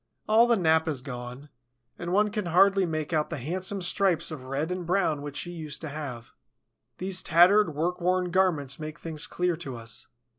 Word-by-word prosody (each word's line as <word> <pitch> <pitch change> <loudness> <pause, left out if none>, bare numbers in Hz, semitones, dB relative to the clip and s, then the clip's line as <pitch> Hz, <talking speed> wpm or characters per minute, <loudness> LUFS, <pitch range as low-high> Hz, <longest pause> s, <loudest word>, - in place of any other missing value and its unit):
All 225 +2 +5
the 235 -1 +3
nap 160 -2 +3
is 140 -5 -2
gone; 125 +1 -8 0.5
and 175 0 -4
one 210 +2 +3
can 210 -4 -3
hardly 195 +2 +4
make 155 0 -3
out 155 -1 +1
the - - -4
handsome 185 +8 -2
stripes 180 -2 +1
of 150 -5 -7
red 140 +6 -2
and 180 0 -3
brown 170 -4 +1
which 145 0 -6
she 175 - -3
used 155 -4 -5
to 155 - -4
have. 140 -6 -7 0.7
These 185 0 0
tattered, 175 +1 +5
work 175 +4 -1
worn 180 0 +1
garments 160 -8 +1
make 155 +1 -6
things 160 -2 -4
clear 180 -1 0
to 140 -6 -6
us. 115 -1 -8
165 Hz, 190 wpm, -27 LUFS, 145-185 Hz, 0.7 s, All